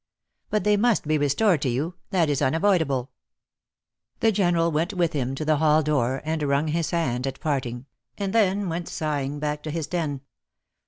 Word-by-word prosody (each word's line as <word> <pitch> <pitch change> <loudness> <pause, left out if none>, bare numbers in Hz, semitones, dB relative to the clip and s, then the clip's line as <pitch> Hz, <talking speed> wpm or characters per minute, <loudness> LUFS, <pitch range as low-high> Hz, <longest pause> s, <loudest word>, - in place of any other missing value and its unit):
"But 215 - 0
they 210 0 +3
must 220 -6 +2
be 155 -1 +2
restored 150 +4 +2
to 135 - 0
you. 145 +9 -2 0.2
That 180 -5 +2
is 145 -2 0
unavoidable." 160 -5 +1 1.1
The 225 - +4
General 175 -4 +2
went 165 +6 -1
with 175 -3 +1
him 135 -2 -2
to 155 - -4
the 155 0 +3
hall 155 +1 +3
door, 135 -3 0
and 160 0 -1
wrung 145 +2 +1
his 165 +1 -1
hand 135 -7 -1
at 135 0 -5
parting, 130 -4 -2 0.3
and 200 -2 -2
then 200 -3 +2
went 170 0 -3
sigh 150 -3 -2
ing 140 +2 -4
back 150 0 -2
to 155 - -6
his 160 0 -2
den. 155 -4 -3
155 Hz, 190 wpm, -25 LUFS, 140-175 Hz, 1.1 s, The